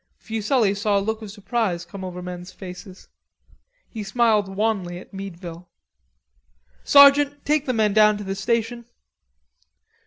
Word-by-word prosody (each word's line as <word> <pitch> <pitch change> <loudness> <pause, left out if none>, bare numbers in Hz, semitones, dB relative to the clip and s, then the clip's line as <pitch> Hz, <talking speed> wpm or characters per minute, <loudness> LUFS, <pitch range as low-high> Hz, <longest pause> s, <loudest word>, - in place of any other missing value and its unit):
Fuselli 220 -1 0
saw 205 0 0
a - - +3
look 220 +3 -3
of 215 - -8
surprise 205 -4 -2
come 190 +2 -9
over 180 -1 -6
men's 180 0 -8
faces. 185 0 -11 0.8
He 220 - -7
smiled 210 -1 +2
wanly 195 -5 -1
at 180 - -13
Meadville. 180 -3 -8 1.1
"Sergeant, 280 0 +6
take 300 -1 +1
the 255 - +1
men 215 -3 +1
down 215 0 +5
to 205 - -7
the 195 0 -3
station." 230 +4 -2
205 Hz, 135 wpm, -23 LUFS, 190-230 Hz, 1.1 s, Sergeant